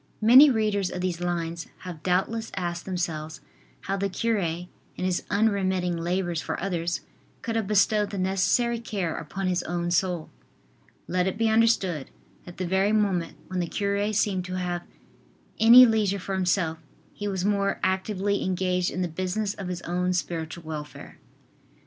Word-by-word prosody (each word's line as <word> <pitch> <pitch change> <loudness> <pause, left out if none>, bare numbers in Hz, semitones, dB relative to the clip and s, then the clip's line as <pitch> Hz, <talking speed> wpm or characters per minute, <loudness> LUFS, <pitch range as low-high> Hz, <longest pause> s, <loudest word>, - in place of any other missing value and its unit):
Many 255 +7 +9
readers 210 -5 +1
of 180 - -5
these 180 -2 -2
lines 170 -1 -3
have 175 -4 -8
doubtless 195 +6 0
asked 175 -2 -3
themselves 160 -4 -3 0.4
how 195 +1 -2
the 200 0 -1
cure, 225 +3 0
in 175 0 -3 0.3
his 185 -1 -1
unremitting 190 -4 +1
labors 175 0 -1
for - - -4
others, 175 -2 -2 0.4
could 230 - -2
have 220 -3 0
bestowed 210 0 +3
the 200 - -5
necessary 200 +6 +1
care 195 -8 -3
upon 190 +5 -5
his 180 -1 +1
own 175 0 -2
soul. 175 -2 0 0.8
Let 180 +1 +1
it 190 - -2
be 225 0 +2
understood 220 -9 +2 0.4
that 175 - -11
the 185 - -2
very 190 +3 +2
moment 195 -6 0
when 185 -1 -4
the 175 - -1
cure 200 +2 -1
seemed 195 -3 0
to 185 0 -5
have 175 -1 -2 0.8
any 235 +3 +10
leisure 215 -4 +2
for 195 +1 -5
himself, 180 -3 0 0.3
he 205 - -5
was 190 -2 -2
more 200 -1 +1
actively 195 +1 0
engaged 180 -1 0
in 185 - -2
the - - 0
business 185 +5 -2
of 195 -3 -7
his 180 -1 -5
own 180 +1 0
spiritual 170 -1 -3
welfare. 155 -2 -8
185 Hz, 160 wpm, -26 LUFS, 175-205 Hz, 0.8 s, any